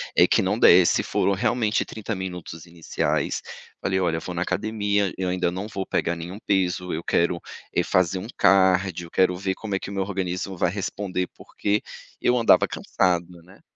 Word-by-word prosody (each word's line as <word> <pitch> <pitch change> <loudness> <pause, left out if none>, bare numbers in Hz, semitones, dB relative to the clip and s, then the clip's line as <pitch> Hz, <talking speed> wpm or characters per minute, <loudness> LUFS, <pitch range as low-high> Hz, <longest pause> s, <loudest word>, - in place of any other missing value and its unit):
é - - +7
que - - +3
não - - 0
desse 90 0 +6
foram 100 - +1
realmente 110 +3 +1
30 110 0 -5
minutos 90 -3 -7
iniciais, 85 -2 -2 0.4
falei: 95 -1 0
"Olha, 85 -3 +1
eu - - -5
vou 90 - -6
na 85 0 -1
academia, 105 -1 0
eu 95 - -2
ainda 90 -1 0
não 95 +4 -5
vou 95 -3 -4
pegar 85 - -1
nenhum 85 +4 -7
peso. 90 -3 0
Eu 80 - -3
quero 85 0 +1 0.3
é - - +2
fazer 90 0 +1
um 95 - -7
cardio. 95 -2 +3
Eu - - -20
quero 95 -1 +3
ver 95 +1 -2
como 105 -3 -4
é - - 0
que - - -7
o - - -6
meu 95 -1 0
organismo 95 -1 -3
vai 85 0 +1
responder. 95 -1 -3
Porque 105 +1 -2 0.4
eu 125 - +3
andava 115 - +5
cansado, 90 -2 -1
né? 95 +3 -19
95 Hz, 190 wpm, -24 LUFS, 90-100 Hz, 0.4 s, é